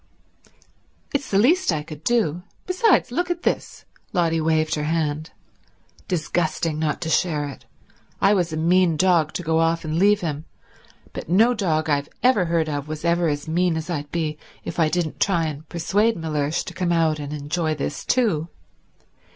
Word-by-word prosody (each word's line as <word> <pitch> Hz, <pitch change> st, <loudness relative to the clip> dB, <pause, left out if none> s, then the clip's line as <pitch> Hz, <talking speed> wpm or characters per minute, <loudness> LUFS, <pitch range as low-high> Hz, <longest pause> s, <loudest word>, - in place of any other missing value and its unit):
"It's 280 Hz, -1 st, -1 dB
the 195 Hz, -, +2 dB
least 290 Hz, -, +4 dB
I 155 Hz, -2 st, -2 dB
could 155 Hz, -1 st, -10 dB
do. 180 Hz, -8 st, +1 dB, 0.2 s
Besides—look 360 Hz, -, +2 dB
at 350 Hz, 0 st, -2 dB
this." -, -, -2 dB, 0.3 s
Lotty 165 Hz, -3 st, +1 dB
waived 155 Hz, 0 st, +1 dB
her 150 Hz, -1 st, -1 dB
hand. 155 Hz, -1 st, -1 dB, 0.8 s
"Disgusting 165 Hz, -2 st, -1 dB
not 155 Hz, -1 st, -1 dB
to 160 Hz, -, -3 dB
share 155 Hz, -5 st, +1 dB
it. 140 Hz, -, -10 dB, 0.5 s
I 195 Hz, +1 st, +4 dB
was 175 Hz, -4 st, +1 dB
a 155 Hz, -, -3 dB
mean 170 Hz, 0 st, +3 dB
dog 170 Hz, -3 st, +3 dB
to 180 Hz, -, -4 dB
go 160 Hz, 0 st, +1 dB
off 165 Hz, 0 st, +1 dB
and 155 Hz, +1 st, -1 dB
leave 205 Hz, +2 st, +4 dB
him, 155 Hz, -2 st, -3 dB, 0.7 s
but -, -, -7 dB
no 220 Hz, +8 st, +5 dB
dog 160 Hz, -8 st, 0 dB
I've 145 Hz, -1 st, 0 dB
every 245 Hz, -8 st, +4 dB
heard 165 Hz, -1 st, +1 dB
of 145 Hz, -1 st, -3 dB
was 155 Hz, +1 st, -6 dB
ever 170 Hz, 0 st, +2 dB
as 145 Hz, 0 st, -2 dB
mean 170 Hz, +1 st, +1 dB
as 160 Hz, +2 st, -4 dB
I'd 145 Hz, -3 st, -4 dB
be 155 Hz, -3 st, -2 dB, 0.3 s
if -, -, -5 dB
I 160 Hz, -2 st, +4 dB
didn't 170 Hz, -2 st, -2 dB
try 175 Hz, -5 st, +2 dB
and 155 Hz, 0 st, -6 dB
persuade 205 Hz, +6 st, +1 dB
Mellersh 155 Hz, -1 st, -1 dB
to -, -, -8 dB
come 180 Hz, -2 st, -1 dB
out 160 Hz, -2 st, +2 dB
and 145 Hz, -1 st, -6 dB
enjoy 155 Hz, +2 st, -2 dB
this 145 Hz, 0 st, -4 dB
too. 205 Hz, -11 st, +1 dB
165 Hz, 175 wpm, -23 LUFS, 155-180 Hz, 0.8 s, no